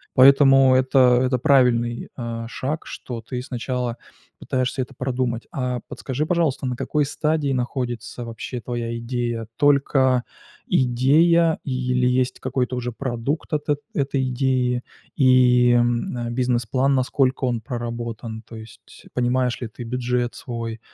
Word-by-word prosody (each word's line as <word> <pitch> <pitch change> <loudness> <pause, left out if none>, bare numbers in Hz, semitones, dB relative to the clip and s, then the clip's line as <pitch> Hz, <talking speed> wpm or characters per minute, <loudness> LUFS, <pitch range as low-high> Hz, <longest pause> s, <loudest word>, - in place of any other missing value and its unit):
Поэтому 135 0 +7
это 130 -1 +4
это 125 -1 +1
правильный, 125 -4 +2
э, 115 -1 -5
шаг, 145 +4 -4
что 120 -3 -7
ты 125 +2 -5
сначала 125 -1 -3 0.4
пытаешься 130 +1 -1
это 130 +2 -6
продумать. 125 -2 -2
А 125 -2 -2
подскажи, 140 +3 -3
пожалуйста, 155 -5 0
на 125 - -2
какой 150 -1 0
стадии 150 0 -1
находится 120 -2 -3
вообще 115 +1 -6
твоя 115 -1 -4
идея? 120 -1 -3
Только 135 -3 +3 0.4
идея 155 +7 +3
или 125 -1 0
есть 125 0 0
какой-то 130 -1 -2
уже 125 0 -3
продукт 130 +4 -3
от 150 0 -1
эт 145 -1 +2
этой 135 -5 0
идеи 125 -1 0 0.3
и, 125 -2 +5
м, 120 0 +1
э, - - -3
бизнес-план, 125 +2 +1
насколько 130 0 +1
он 120 -2 0
проработан? 115 -2 -5
То 115 - -11
есть 110 +1 -13
понимаешь 125 0 0
ли 120 - -4
ты 115 +2 -9
бюджет 125 0 -1
свой, 115 -2 -5
125 Hz, 135 wpm, -22 LUFS, 120-135 Hz, 0.4 s, Поэтому